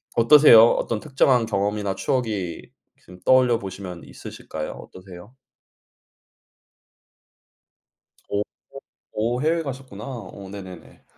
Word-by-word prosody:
어떠세요? 115 -1 +8
어떤 110 -2 -2
특정한 130 -3 +2
경험이나 100 0 -2
추억이 105 -8 -2 0.4
지금 90 0 -16
떠올려 125 -3 +4
보시면 95 -3 -8
있으실까요? 75 -1 -8
어떠세요? 95 +3 -13 3.0
오. 100 - -1
오. 105 - 0 0.7
오. 120 +4 -1
해외 165 +2 +1
가셨구나. 130 -7 -8
오. 100 -6 -9
네네네. 95 -3 -11
105 Hz, 245 characters per minute, -23 LUFS, 95-125 Hz, 3.0 s, 어떠세요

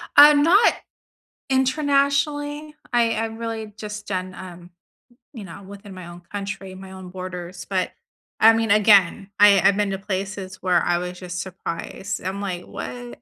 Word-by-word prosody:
I'm 290 0 +8
not 390 +8 +5 0.8
internationally, 285 +2 0 0.2
I 235 -1 +3
I 225 +1 -1
really 225 -1 -6
just 210 -1 -7
done, 185 -1 -4
um, 180 -1 -11 0.6
you 225 -6 -8
know, 190 +2 -10
within 200 0 -11
my 180 -2 -9
own 175 0 -11
country, 195 -2 -6
my 190 0 -11
own 190 -1 -10
borders, 180 -1 -7
but 185 -2 -1 0.5
I 225 +1 +7
mean, 225 -2 0
again, 200 -2 +4
I 205 -2 +7
I've 200 - +4
been 205 -1 0
to 195 - -2
places 190 -1 -5
where 180 -2 +2
I 175 0 +1
was 180 0 -6
just 180 0 -5
surprised. 190 +1 -6
I'm, 190 +2 -3
like, 180 -3 -4
"What?" 120 -1 -8
195 Hz, 160 wpm, -22 LUFS, 185-225 Hz, 0.8 s, I'm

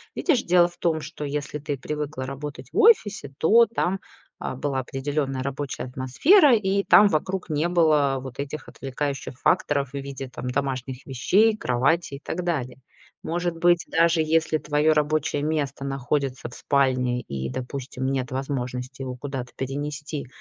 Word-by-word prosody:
Видишь, 305 -9 +2
дело 175 0 +5
в 175 0 -15
том, 165 -2 0
что 150 0 -7
если 145 0 -3
ты 145 -1 -3
привыкла 150 0 -4
работать 140 +2 -7
в - - -4
офисе, 400 - +4
то 230 +8 +6
там, 195 -4 -1 0.4
а, - - -4
была 135 0 -2
определенная 135 +1 -2
рабочая 140 +1 -4
атмосфера, 190 - +4
и 200 -2 +1
там 210 - +7
вокруг 185 +2 -1
не 155 +2 0
было 155 -6 +3
вот 130 0 -9
этих 140 +2 -5
отвлекающих 135 -1 -5
факторов 140 -2 +1
в - - -33
виде 135 -1 -6
там 125 - -6
домашних 130 -1 -3
вещей, 200 - +3
кровати 135 - +1
и - - -9
так 180 - -3
далее. 135 -8 -2 0.5
Может 175 0 -2
быть, 175 +1 +3
даже 165 0 +3
если 160 0 +1
твое 150 +1 +2
рабочее 150 -1 0
место 145 -3 -2
находится 135 -1 -2
в - - -14
спальне 130 -3 +1
и, 65 - -5
допустим, 130 - -5
нет 130 -1 -1
возможности 130 -1 -4
его 130 -1 -4
куда-то 130 -2 -5
перенести, 145 +2 -4
145 Hz, 155 wpm, -24 LUFS, 130-165 Hz, 0.5 s, там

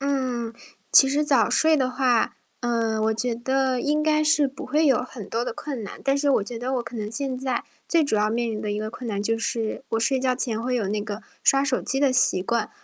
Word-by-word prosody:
嗯， 255 -4 -1 0.4
其 270 - +8
实 290 +2 +1
早 265 -7 +3
睡 315 0 +4
的 260 -3 +1
话， 255 -3 +1 0.2
嗯， 230 -2 0
我 220 0 +1
觉 240 +1 -1
得 260 +1 0
应 300 +2 +1
该 305 0 +2
是 300 -2 +3
不 265 - -9
会 305 +2 +2
有 270 -3 +4
很 235 -5 -9
多 230 +3 -1
的 - - -3
困 275 -6 -6
难。 - - -9
但 275 0 +2
是 285 0 +2
我 260 - +3
觉 235 +2 -7
得 255 +3 -2
我 250 - -1
可 235 +1 -9
能 210 -1 -4
现 265 +1 -3
在 260 -2 -2 0.2
最 335 -2 +3
主 280 - +1
要 210 0 +2
面 235 +1 -1
临 215 -1 -4
的 210 - -3
一 205 - -2
个 215 0 -4
困 245 +2 -8
难 200 -2 -2
就 225 +2 0
是 225 +1 -2
我 225 - 0
睡 265 +3 +2
觉 255 0 +1
前 235 -3 -2
会 250 +2 -2
有 220 -6 -1
那 210 +1 -1
个 210 +1 -6 0.2
刷 275 0 +5
手 265 -2 0
机 270 - -2
的 280 -2 +3
习 245 -7 +4
惯， 235 +2 -1
250 Hz, 270 characters per minute, -24 LUFS, 225-275 Hz, 0.4 s, 其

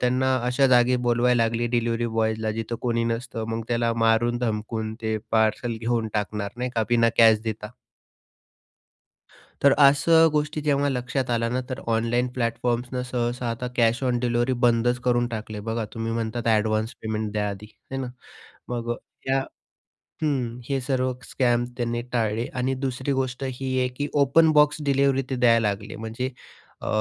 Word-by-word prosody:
त्यांना 130 +1 +2
अशा 125 +2 +3
जागी 125 0 +4
बोलवायला 120 0 +3
लागली, 115 +1 0
डिलिव्हरी 120 0 0
बॉयजला 110 -1 0
जिथं 115 +1 -4
कोणी 115 -1 0
नसतं 115 0 -3
मग 115 0 -2
त्याला 115 -1 +1
मारून 115 +1 +2
धमकून 110 -1 -3
ते 110 0 0
पार्सल 110 +1 +1
घेऊन 115 -1 0
टाकणार 105 -1 -2
नाही 125 +1 -2
का 115 - +2
बिना 115 -1 +4
कॅश 110 -2 +7
देता. 110 -1 -4 2.0
तर 140 - +7
असं 145 +4 +6
गोष्टी 150 0 -1
जेव्हा 145 -1 +1
लक्षात 130 0 -2
आल्या 115 0 +1
ना 125 +2 -1
तर 130 - -4
ऑनलाईन 115 +2 +1
प्लॅटफॉर्म्सनं 120 +1 -1
सहसा 125 -1 -2
आता 115 +2 -3
कॅश 120 +2 +2
ऑन 125 -2 +1
डिलिव्हरी 120 +1 +1
बंदच 120 +1 +2
करून 120 -1 +2
टाकले, 110 -2 -6
बघा 110 +1 -3
तुम्ही 115 0 -3
म्हणतात 115 +1 -2
ॲडव्हान्स 110 0 +1
पेमेंट 110 -1 -3
द्या 105 -1 -1
आधी, 100 +1 -7 0.3
आहे 135 - -3
ना? 130 - -4 0.6
मग 120 -1 -2 0.4
या 135 0 +2 0.8
हं. 125 -5 -1
हे 135 -1 +1
सर्व 130 -1 0
स्कॅम 120 -2 +1
त्यांनी 120 -1 -1
टाळले 115 -1 0
आणि 130 +1 0
दुसरी 130 +1 -2
गोष्ट 130 -1 -2
ही 130 0 -3
आहे 125 - +2
की 145 - -1
ओपन 150 +3 +4
बॉक्स 150 0 +4
डिलिव्हरी 140 -1 +2
ते 135 - -1
द्यायला 115 -3 +4
लागले 100 0 -5
म्हणजे? 115 +4 -4 0.5
अ, - - -6
120 Hz, 160 wpm, -24 LUFS, 115-130 Hz, 2.0 s, कॅश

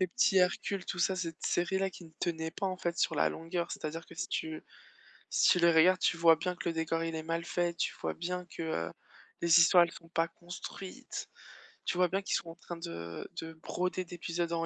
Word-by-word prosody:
les 185 - +3
petits 250 +1 +2
Hercules 180 +2 +1
tout 180 - -4
ça 185 +2 +2
cette 165 -3 -4
série-là 190 +2 +1
qui 180 - -11
ne 160 - -14
tenait 160 -2 -1
pas 195 - -2
en 185 -1 -2
fait 170 -2 -2
sur - - +2
la - - +3
longueur, 170 +1 -3
c'est-à-dire 160 +2 -5
que - - -13
si 125 - -3
tu 160 -1 -3 0.7
si - - +5
tu 180 - +5
les 170 0 +6
regardes, 180 +3 +6
tu 175 - +3
vois 165 -1 +7
bien 180 +2 -2
que - - -3
le - - +1
décor, 165 0 -1
il 165 0 -3
est 160 - -3
mal 165 +1 -2
fait, 175 -1 0
tu - - 0
vois - - -2
bien 180 +1 -3
que, 165 - -7
heu, 85 - -2 0.5
les 170 0 +7
histoires 175 +1 +8
elles 170 - -6
sont 165 - -13
pas 165 0 +1
construites, 175 +3 -7 0.6
tu 175 - 0
vois 180 -1 +5
bien 195 +3 -1
qu'ils - - 0
sont 165 - -7
en 165 - -12
train 175 0 -8
de 85 - -6
de 160 0 -7
broder 180 +3 -2
d'épisode 170 0 -3
en 165 0 0
170 Hz, 235 wpm, -32 LUFS, 165-180 Hz, 0.7 s, histoires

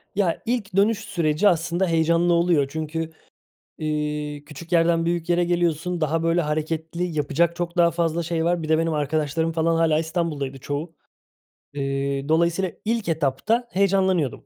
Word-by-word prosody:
Ya, 190 -4 0
ilk 225 -6 -2
dönüş 205 +2 +3
süreci 170 -3 +1
aslında 175 +1 +1
heyecanlı 170 +1 +2
oluyor. 170 -4 +3
Çünkü, 160 +2 -4 0.7
eee, 150 -1 -3
küçük 160 +3 -11
yerden 165 -1 +3
büyük 170 0 -1
yere 175 0 +3
geliyorsun. 175 0 0
Daha 160 +2 0
böyle 165 +1 +2
hareketli 160 +2 -2
yapacak 155 +4 +1
çok 175 0 -4
daha 170 -1 +5
fazla 170 0 0
şey 165 0 -1
var. 175 -1 +1
Bir 155 - -5
de 160 - +4
benim 165 0 0
arkadaşlarım 155 +2 0
falan 165 0 +1
hâlâ 165 -2 +3
İstanbul'daydı 160 -5 -2
çoğu. 150 +5 -5 0.8
Eee, 140 0 -2
dolayısıyla 170 +3 +2
ilk 225 -3 -1
etapta 165 - 0
heyecanlanıyordum. 190 - +1
165 Hz, 150 wpm, -23 LUFS, 155-175 Hz, 0.8 s, daha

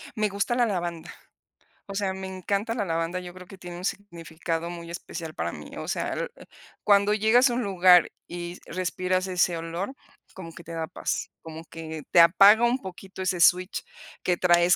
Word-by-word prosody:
Me 215 -1 +1
gusta 200 +5 -1
la 245 -1 +3
lavanda. 175 -5 -3 0.8
O 195 - -6
sea, 195 -2 0
me 190 0 -6
encanta 200 +4 -2
la 210 -4 -2
lavanda. 165 +2 -1
Yo 180 -1 -9
creo 180 -1 -12
que 195 - -12
tiene 175 -1 -8
un 180 - -6
significado 170 -3 -4
muy 170 -1 -8
especial 165 -2 -7
para - - -3
mí. - - -10
O - - -6
sea, - - -2 0.6
cuando 205 0 +4
llegas 230 +5 +4
a - - -1
un 245 0 -1
lugar 180 -2 +5 0.2
y 175 0 -6
respiras 185 +1 -1
ese 180 -2 +1
olor, 170 +9 -4 0.4
como 165 -3 -9
que 170 - -12
te 165 - -9
da 160 -1 -3
paz, - - -3
como 160 0 -9
que 160 -2 -8
te 175 - +6
apaga 195 +7 +7
un 245 +2 +2
poquito 190 0 -9
ese 185 -1 0
switch 180 +2 +3 0.4
que 180 - +1
traes 175 0 +4
180 Hz, 185 wpm, -26 LUFS, 170-200 Hz, 0.8 s, apaga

